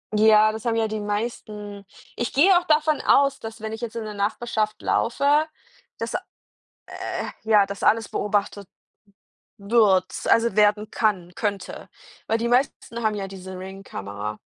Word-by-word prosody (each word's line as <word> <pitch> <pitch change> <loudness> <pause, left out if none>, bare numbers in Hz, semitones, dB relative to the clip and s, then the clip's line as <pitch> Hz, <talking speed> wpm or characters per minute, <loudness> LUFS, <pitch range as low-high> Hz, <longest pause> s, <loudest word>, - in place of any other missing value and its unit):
Ja, 215 0 +6
das 220 +3 -8
haben 230 -1 +1
ja 225 -1 +1
die 215 0 -4
meisten. 210 -1 -5 0.3
Ich 240 - -3
gehe 360 +7 +6
auch 350 - -11
davon 305 0 +2
aus, 275 0 +3
dass 225 0 -8
wenn 220 0 -4
ich 225 - -7
jetzt 235 -1 -5
in 230 - -3
der 215 -1 -6
Nachbarschaft 215 +1 -1
laufe, 285 +6 +2 0.5
dass, - - -4
äh - - 0 1.2
ja, 215 -2 +5
das 200 -1 -7
alles 225 0 +2
beobachtet 205 -1 -1 0.9
wird. 200 -3 +3 0.2
Also, 230 -3 +3
werden 210 0 +3
kann 190 -7 -1
könnte. 205 -3 -4 0.4
Weil 225 - +1
die 235 - -1
meisten 245 -2 0
haben 215 -1 +2
ja 195 -1 -4
diese 190 -1 -9
Ring-Kamera. 105 - -7
215 Hz, 155 wpm, -24 LUFS, 200-230 Hz, 1.2 s, Ja